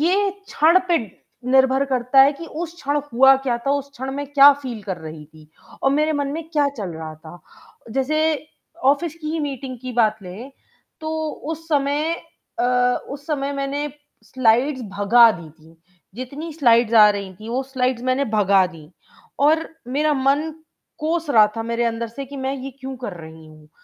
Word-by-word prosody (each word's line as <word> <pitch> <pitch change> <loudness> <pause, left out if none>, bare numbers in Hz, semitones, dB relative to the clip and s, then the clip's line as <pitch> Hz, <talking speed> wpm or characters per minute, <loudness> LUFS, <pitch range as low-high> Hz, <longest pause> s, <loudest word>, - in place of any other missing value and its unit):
ये 390 +5 +2 0.2
क्षण 330 +4 +4
पे 340 - +4 0.5
निर्भर 265 +1 +4
करता 250 +2 +4
है 280 +2 +4
कि 330 +4 -9 0.2
उस 335 0 -6
क्षण 290 -2 -1
हुआ 265 +3 +7
क्या 240 -1 +1
था, 255 +4 -2
उस 280 0 -2
क्षण 265 +1 -5
में 285 +1 -4
क्या 285 0 +8
फील 235 -5 -6
कर 190 -2 -4
रही 155 -1 -9
थी 155 0 -18 0.3
और 270 - +3
मेरे 305 +2 +2
मन 285 -1 -1
में 325 +2 -4
क्या 295 -3 +2
चल 190 -4 -4
रहा 160 -1 -7
था, 160 +3 -13 0.5
जैसे 305 +4 0 0.4
ऑफ़िस 290 +4 +2
की 305 - -3
ही 325 - -2
मीटिंग 270 -3 -5
की 255 -1 -5
बात 220 -2 +2
लें, 200 +9 -9 0.5
तो 315 0 -4 0.2
उस 320 +2 -7
समय 295 +2 +1 0.5
अ, - - +2 0.5
उस 285 +1 -8
समय 285 -2 -2
मैंने 280 +2 -2 0.4
स्लाइड्स 260 +3 +2 0.2
भगा 230 +3 +6
दी 170 -4 -10
थीं, 160 +1 -21 0.4
जितनी 280 +7 -7
स्लाइड्स 235 -6 +3
आ 215 -2 +8
रही 200 -2 -4
थीं 215 +5 -11
वो 255 +2 -1
स्लाइड्स 255 -2 -1
मैंने 255 +2 +1
भगा 200 -3 +4
दीं 160 -4 -14 0.6
और 320 +2 +2 0.2
मेरा 300 +4 +1
मन 280 +4 +1 0.5
कोस 330 +1 -2
रहा 215 -5 +6
था 225 - -2
मेरे 235 +1 -1
अंदर 230 0 -2
से 275 +5 -7
कि 280 +1 -9
मैं 265 +1 -2
ये 270 +1 -6
क्यों 265 0 -6
कर 240 -5 -6
रही 160 0 -12
हूँ, 155 -1 -17
265 Hz, 185 wpm, -21 LUFS, 225-290 Hz, 0.6 s, क्या